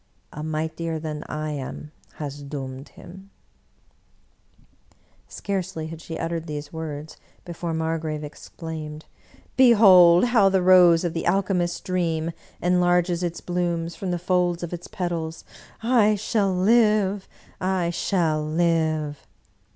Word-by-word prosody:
A 150 - -7
mightier 160 +1 -3
than 155 -1 -5
I 155 0 -3
am 145 +1 -6 0.2
has 145 -1 -7
doomed 135 -1 -7
him! 190 +3 -13 1.3
" - - -36 0.5
Scarcely 185 -5 -4
had 160 0 -8
she 165 -1 -7
uttered 165 0 -3
these 150 0 -6
words 155 -1 -6 0.3
before 170 -1 -5
Margrave 160 -1 -2
exclaimed, 155 0 -8 0.3
" - - -26
Behold 195 -8 +7
how 230 -5 +4
the 190 -1 +1
Rose 180 -2 +6
of 170 -2 -1
the 165 - -3
alchemist's 180 -3 0
dream 170 -3 -1 0.3
enlarges 175 0 +2
its 170 -1 -3
blooms 170 -1 -2
from 190 - -5
the 175 - 0
folds 175 -1 0
of 170 - -5
its 175 0 -7
petals! 165 -3 -4 0.4
I 225 -3 +4
shall 205 -1 0
live, 205 0 +2 0.3
I 185 -2 0
shall 165 -3 0
live!" 155 -2 0
170 Hz, 130 wpm, -24 LUFS, 155-185 Hz, 1.3 s, Behold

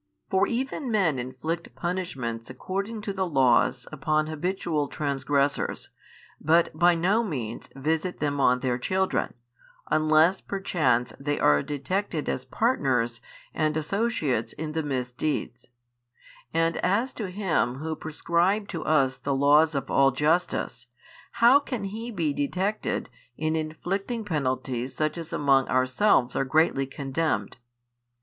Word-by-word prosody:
For 190 - +3
even 265 +3 -2
men 185 - +2
inflict 160 +7 -5
punishments 135 -11 -3
according 200 - -4
to 205 -1 -4
the 190 -1 -1
laws 130 -4 +3
upon 155 -1 0
habitual 155 -1 -2
transgressors, 140 0 -1 0.5
but 165 +3 +3
by 175 +2 +4
no 195 +8 +2
means 125 - -5
visit 160 +6 -1
them 145 -1 -1
on 125 -2 +3
their 125 -2 0
children, 190 +4 0 0.6
unless 155 +4 +4
perchance 145 -11 0
they 145 +1 -1
are 75 0 +4
detected 155 - -2
as 130 - -2
partners 130 - 0 0.3
and 155 -1 0
associates 155 - -1
in 155 0 -5
the 160 +1 -1
misdeeds: 130 -1 -3 0.8
and 165 0 +1
as 215 +8 +1
to 210 -5 -4
Him 180 -10 0
Who 155 +3 -4
prescribed 170 +7 0
to 165 -4 -4
us 135 -4 +2
the 140 -1 -2
laws 150 +3 +4
of 135 -1 -3
all 135 0 +5
justice, 150 -3 0 0.5
how 245 +5 +6
can 255 -6 -5
He 220 +4 -5
be 165 -10 -1
detected 185 +9 -1 0.3
in 155 +1 0
inflicting 195 +8 -3
penalties 130 -6 -2
such 155 0 0
as 165 -1 -7
among 135 -2 +3
ourselves 130 +2 +2
are - - +2
greatly 135 -1 +2
condemned? 140 +2 -2
155 Hz, 130 wpm, -26 LUFS, 135-185 Hz, 0.8 s, how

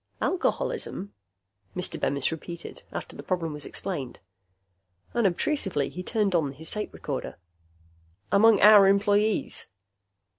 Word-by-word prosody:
"Alcoholism?" 345 - -1 0.6
Mr. 180 - -4
Bemis 140 +2 0
repeated, 170 +1 -7
after - - -6
the - - -7
problem 170 -4 -2
was 150 0 -6
explained. 140 -10 -5 1.0
Unobtrusively, 195 - 0
he 180 - -6
turned 205 0 0
on 150 -5 +1
his 160 +4 -4
tape 210 0 -4
recorder. - - -5 0.9
"Among 215 0 +6
our 210 -1 +9
employees?" 205 +2 +2
195 Hz, 110 wpm, -27 LUFS, 165-210 Hz, 1.0 s, our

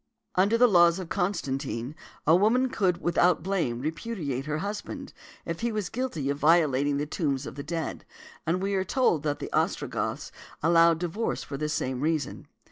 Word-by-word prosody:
|152| 185 - +5
Under 205 +4 +3
the 245 +1 +6
laws 175 -4 +5
of 185 -3 -6
Constantine, 140 - -2 0.3
a 160 - +6
woman 235 +7 +3
could 185 -8 0
without 175 -1 +3
blame 170 -11 -1
repudiate 150 - -3
her 150 0 -1
husband, 205 +5 -5 0.3
if 165 -1 -4
he 235 0 -1
was 210 -4 -2
guilty 240 - -3
of 140 - -4
violating 145 -3 +3
the 145 - -1
tombs 145 -4 -2
of - - -6
the 140 - -6
dead; 165 +2 -4 0.4
and 180 +4 0
we 200 +1 0
are 190 -1 +1
told 190 - +2
that 145 -1 -1
the - - -7
Ostrogoths - - -1 0.3
allowed 165 0 +5
divorce 180 +7 -2
for 140 - -6
this 150 +2 -2
same 130 -2 -2
reason. 155 -2 -2
165 Hz, 180 wpm, -27 LUFS, 145-195 Hz, 0.4 s, the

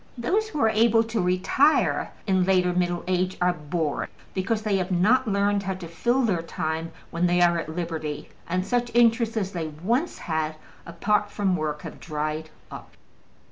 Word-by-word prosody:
Those 405 - 0
who 305 - -4
are 225 - +5
able 225 +1 +4
to 225 -2 -2
retire 185 - +2
in 190 -2 +2
later 180 -1 +2
middle 175 -1 0
age 185 0 0
are 180 0 +3
bored, 155 -1 -2 0.2
because 210 +3 -1
they 210 -2 +1
have 185 0 -2
not 220 +9 +3
learned 200 0 +1
how 190 -1 -3
to 180 -2 -8
fill 240 +10 +1
their 190 -8 +1
time 160 0 -3 0.2
when 170 +1 +1
they 175 0 +2
are 170 -1 +4
at 165 - -5
liberty, 160 -4 -4 0.2
and 185 +2 0
such 245 +1 0
interests 230 -1 +3
as 195 -3 -1
they 170 -4 -3
once 220 - -1
had 160 -1 -2 0.3
apart 205 +5 0
from 200 -3 0
work 155 -2 -3
have - - -8
dried 155 0 -3 0.2
up. - - -11
185 Hz, 180 wpm, -25 LUFS, 170-220 Hz, 0.3 s, are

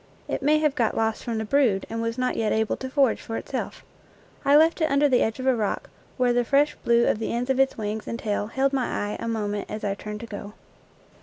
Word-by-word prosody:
It - - -2
may 300 +2 +4
have 305 -2 +2
got 235 -6 0
lost 225 0 0
from 230 -2 -3
the 220 - -2
brood 230 -6 +2
and 225 0 -4
was 230 +1 -2
not 255 0 0
yet 220 -1 0
able 220 -1 +1
to 260 - -6
forage 270 -3 +2
for 225 - -5
itself. - - -5 0.6
I 280 - +5
left 320 +3 +4
it 315 - +2
under 280 +1 +4
the 255 -3 +3
edge 220 +3 0
of 255 - -4
a 260 -1 +4
rock, 215 -3 -2 0.3
where 250 -2 +3
the 245 0 +2
fresh 280 +4 +3
blue 235 0 +4
of - - +1
the 225 - -2
ends 245 +3 -1
of 265 - 0
its 270 0 +2
wings 215 0 -4
and 230 - -3
tail 210 -2 -2
held 270 +4 0
my 260 -2 0 0.2
eye - - -4
a - - -4
moment 210 -2 -2
as 215 - -5
I 200 -1 0
turned 210 +1 -7
to - - -6
go. 205 -2 -8
235 Hz, 255 wpm, -25 LUFS, 220-270 Hz, 0.6 s, I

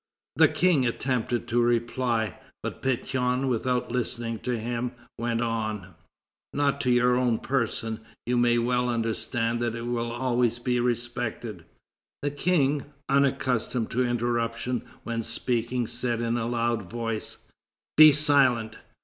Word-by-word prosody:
The - - +7
King 160 -9 +3
attempted 120 -1 -1
to 120 +1 +3
reply, 120 -2 0 0.2
but - - -5
Pétion, 130 0 0
without 125 0 0
listening 120 -2 -2
to 125 -2 -2
him, 120 +2 -3 0.3
went 115 0 0
on: 110 -5 -2 0.6
"Not 140 0 +1
to 125 - 0
your 125 0 +4
own 125 -3 +2
person; 115 -4 -1 0.3
you 125 - 0
may 120 0 +4
well 125 +1 +1
understand 115 0 -1
that 120 -1 -1
it 115 - -5
will 120 -1 -2
always 120 -1 +1
be 125 0 0
respected." 120 -5 -3 0.6
The 145 - 0
King, 145 -2 +1 0.2
unaccustomed 130 -4 +1
to 125 +2 +1
interruption 120 0 -1 0.2
when 115 -1 -2
speaking, 120 +1 -1
said 120 0 -2
in 115 0 0
a 115 -1 -1
loud 115 -5 -1
voice: 115 -2 -4 0.6
"Be 155 0 +10
silent!" 135 -7 +3
120 Hz, 130 wpm, -27 LUFS, 115-125 Hz, 0.6 s, Be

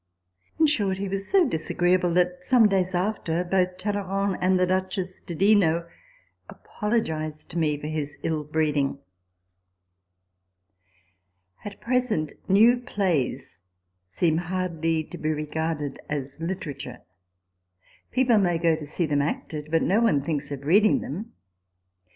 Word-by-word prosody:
In 320 - +6
short, 205 -11 +1
he 200 +1 -3
was 195 +1 -3
so 375 -4 +4
dis 160 -9 -3
agreeable, 175 0 +2
that, 180 0 +1
some 235 +1 +5
days 185 -2 0
after, 175 -3 -1
both 180 0 0
Talleyrand 195 0 -1
and 185 0 +3
the 180 - +4
Duchess 185 0 -2
di 170 - -6
Dino 170 -3 +3 0.6
apologised 160 -9 -3
to 170 - -2
me 150 -2 +1
for 150 - -8
his 150 -1 -3
ill 155 -2 -1
breeding. 150 -2 0 1.1
> 90 0 -38
At 205 -1 -7
present 235 - 0 0.2
new 225 +6 +6
plays 170 - -2 0.5
seem 160 - +1
hardly 165 -2 -1
to 175 +3 -10
be 155 - -1
regarded 155 -1 -3
as 140 -1 -4
literature; 165 -5 -5 1.1
people 250 -4 +3
may 175 -4 +2
go 165 -1 +2
to 155 -2 -8
see 170 +4 -1
them 145 -2 +1
acted, 150 +1 -4
but 165 +1 +2
no 205 +6 +2
one 175 -12 +3
thinks 145 -2 -2
of 140 -1 -6
reading 205 +7 +4
them. 205 - -6
170 Hz, 140 wpm, -25 LUFS, 150-195 Hz, 1.1 s, In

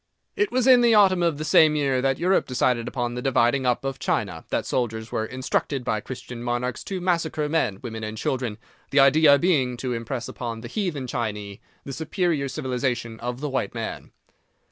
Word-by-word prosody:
It 410 0 +1
was 255 -1 +1
in 255 -2 +7
the 235 -2 +5
autumn 190 -3 +5
of 170 -4 +1
the 155 - -4
same 155 -1 +5
year 135 -3 +1
that 135 0 +1
Europe 185 +2 +2
decided 125 -2 +1
upon 120 -1 -2
the 125 - -4
dividing 130 0 +2
up 125 +2 0
of 135 -1 -3
China, 90 -6 -2
that - - -1
soldiers 110 -2 -2
were 110 - -1
instructed 130 +1 -2
by 110 - -1
Christian 125 +1 -8
monarchs 120 0 -2
to 190 -2 -3
massacre 165 -4 0
men, 150 -11 0
women 110 -2 -6
and 110 0 -5
children, 120 -2 -2 0.3
the 140 - +3
idea 140 +1 +6
being 135 -7 +1
to 125 +1 -3
impress 115 +1 -4
upon 115 -2 -5
the 120 - -7
Heathen 155 - -3
Chinee 105 -4 -4 0.2
the 135 - -7
superior 160 -1 -1
civilization 125 -5 -3
of 125 +2 -5
the 150 - -2
white 130 -7 -2
man. - - -5
130 Hz, 190 wpm, -24 LUFS, 120-155 Hz, 0.3 s, in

